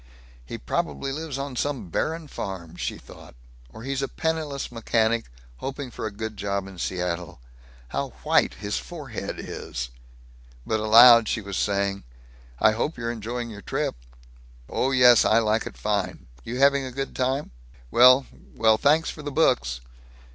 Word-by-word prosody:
"He -, -, -7 dB
probably 70 Hz, -, -2 dB
lives 150 Hz, -1 st, -4 dB
on 140 Hz, -1 st, -5 dB
some 125 Hz, -8 st, -2 dB
barren 160 Hz, -, -2 dB
farm," 95 Hz, -, -6 dB
she -, -, -4 dB
thought, -, -, -14 dB, 0.3 s
"or 110 Hz, -, -11 dB
he's 135 Hz, +1 st, -2 dB
a 135 Hz, -, -1 dB
penniless 155 Hz, -5 st, -3 dB
mechanic 115 Hz, 0 st, +1 dB, 0.3 s
hoping 135 Hz, -1 st, -5 dB
for 110 Hz, -, -4 dB
a -, -, -6 dB
good 110 Hz, +1 st, -6 dB
job 100 Hz, -1 st, -2 dB
in 95 Hz, -2 st, -11 dB
Seattle. 90 Hz, -4 st, -3 dB, 0.5 s
How 70 Hz, +1 st, -2 dB
white -, -, +3 dB
his 105 Hz, +2 st, -3 dB
forehead 145 Hz, -10 st, -6 dB
is!" 60 Hz, -1 st, -6 dB, 0.8 s
But 110 Hz, -, 0 dB
aloud 115 Hz, +1 st, +8 dB
she -, -, 0 dB
was 100 Hz, -2 st, -6 dB
saying, 100 Hz, 0 st, 0 dB, 0.6 s
"I 110 Hz, -, +5 dB
hope 120 Hz, +8 st, -2 dB
you're 115 Hz, -1 st, -2 dB
enjoying 120 Hz, +1 st, -5 dB
your 100 Hz, -2 st, -9 dB
trip." -, -, -2 dB, 0.7 s
"Oh 130 Hz, -, 0 dB
yes. 125 Hz, -3 st, +6 dB
I 110 Hz, -, +4 dB
like 110 Hz, -1 st, +1 dB
it -, -, -10 dB
fine. 105 Hz, -3 st, -2 dB, 0.2 s
You 120 Hz, +2 st, -5 dB
having 140 Hz, +1 st, +4 dB
a 130 Hz, -, -5 dB
good 135 Hz, +2 st, -5 dB
time? 130 Hz, +3 st, -1 dB, 0.4 s
Well 125 Hz, +2 st, +7 dB, 0.3 s
Well, 110 Hz, -1 st, +4 dB
thanks 155 Hz, +3 st, +3 dB
for 150 Hz, -, -10 dB
the 145 Hz, 0 st, -5 dB
books." 65 Hz, -, +1 dB
115 Hz, 160 wpm, -25 LUFS, 100-135 Hz, 0.8 s, aloud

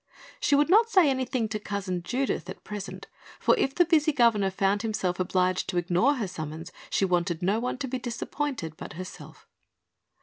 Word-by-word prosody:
She 400 Hz, -13 st, +3 dB
would 295 Hz, +4 st, +3 dB
not 450 Hz, +4 st, +6 dB
say 375 Hz, -8 st, +5 dB
anything 255 Hz, -3 st, -1 dB
to 215 Hz, -1 st, -3 dB
Cousin 195 Hz, -4 st, -3 dB
Judith, 255 Hz, +9 st, -2 dB
at -, -, -8 dB
present, 205 Hz, -2 st, -7 dB, 0.3 s
for -, -, +4 dB
if 270 Hz, -, 0 dB
the 350 Hz, -, +5 dB
busy 315 Hz, -2 st, +3 dB
governor 230 Hz, -8 st, +3 dB
found 195 Hz, +1 st, +1 dB
himself 195 Hz, -5 st, -1 dB
obliged 185 Hz, 0 st, +1 dB
to 180 Hz, -, -2 dB
ignore 180 Hz, +11 st, +2 dB
her 225 Hz, -7 st, -2 dB
summons 160 Hz, -1 st, -7 dB, 0.2 s
she 195 Hz, -, +2 dB
wanted 175 Hz, -1 st, 0 dB
no 200 Hz, +5 st, +2 dB
one 250 Hz, +2 st, -2 dB
to 275 Hz, -, -3 dB
be 260 Hz, 0 st, -3 dB
disappointed 240 Hz, -, -4 dB
but -, -, -8 dB
herself. 185 Hz, +4 st, -10 dB
210 Hz, 180 wpm, -27 LUFS, 185-270 Hz, 0.3 s, not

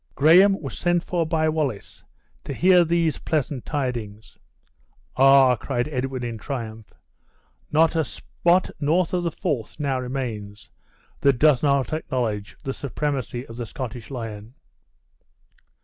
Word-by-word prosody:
Graham 185 Hz, +7 st, +6 dB
was -, -, -7 dB
sent 175 Hz, -1 st, +1 dB
for 170 Hz, -3 st, -1 dB
by 160 Hz, -1 st, +1 dB
Wallace 150 Hz, -9 st, -3 dB, 0.4 s
to 140 Hz, -, -5 dB
hear 180 Hz, +2 st, +5 dB
these 165 Hz, -1 st, 0 dB
pleasant 145 Hz, -4 st, -2 dB
tidings. 120 Hz, -7 st, -4 dB, 0.8 s
"Ah!" 135 Hz, -1 st, +6 dB
cried 120 Hz, +2 st, -2 dB
Edwin, 130 Hz, -3 st, -3 dB
in 115 Hz, -2 st, -4 dB
triumph, 110 Hz, -4 st, -6 dB, 0.8 s
"not 160 Hz, +2 st, +3 dB
a 160 Hz, -, +2 dB
spot 175 Hz, +5 st, 0 dB
north 160 Hz, +4 st, +1 dB
of 180 Hz, -, +1 dB
the 170 Hz, -, 0 dB
Forth 150 Hz, -, -4 dB
now 135 Hz, -3 st, 0 dB
remains, 115 Hz, -6 st, -5 dB, 0.5 s
that 140 Hz, -3 st, +3 dB
does 145 Hz, -2 st, +4 dB
not 140 Hz, -1 st, +1 dB
acknowledge 120 Hz, -9 st, -3 dB
the 135 Hz, -, -3 dB
supremacy 135 Hz, -4 st, -3 dB
of 115 Hz, -2 st, -11 dB
the 120 Hz, -, -4 dB
Scottish 120 Hz, -1 st, -7 dB
lion!" 115 Hz, -2 st, -7 dB
135 Hz, 135 wpm, -23 LUFS, 120-155 Hz, 0.8 s, Graham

